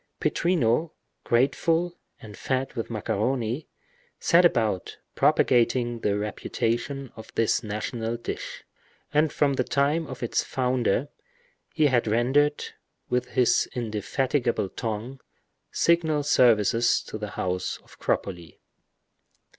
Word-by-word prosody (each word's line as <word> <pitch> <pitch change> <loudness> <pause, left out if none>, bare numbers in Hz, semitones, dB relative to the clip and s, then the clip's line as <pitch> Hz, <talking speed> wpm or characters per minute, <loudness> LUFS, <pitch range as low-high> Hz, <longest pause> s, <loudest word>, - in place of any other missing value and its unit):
Pittrino, 160 -3 +1 0.3
grateful, 165 +8 +1 0.2
and 105 -2 -11
fed 130 +4 -2
with 115 -3 -4
macaroni, 115 +4 -1 0.5
set 175 +1 +5
about 110 - +1 0.2
propagating 120 -1 +2
the 100 -2 0
reputation 120 +5 -2
of 110 - -11
this 115 0 +2
national 115 +2 -3
dish, 120 - -6 0.5
and 150 0 +3
from 140 -2 +2
the 130 - +1
time 145 +5 +1
of 130 -1 -7
its 120 - 0
founder, 125 0 0 0.6
he 155 - +2
had 125 -5 +2
rendered, 130 +7 +2 0.5
with 125 0 +1
his 125 -2 +3
indefatigable 120 0 -1
tongue, 115 +5 -5 0.5
signal 160 -3 +2
services 120 -4 +3
to 110 - -7
the 105 0 -4
house 90 0 -2
of - - -19
Cropoli. 85 -4 -3
120 Hz, 110 wpm, -26 LUFS, 110-140 Hz, 0.6 s, set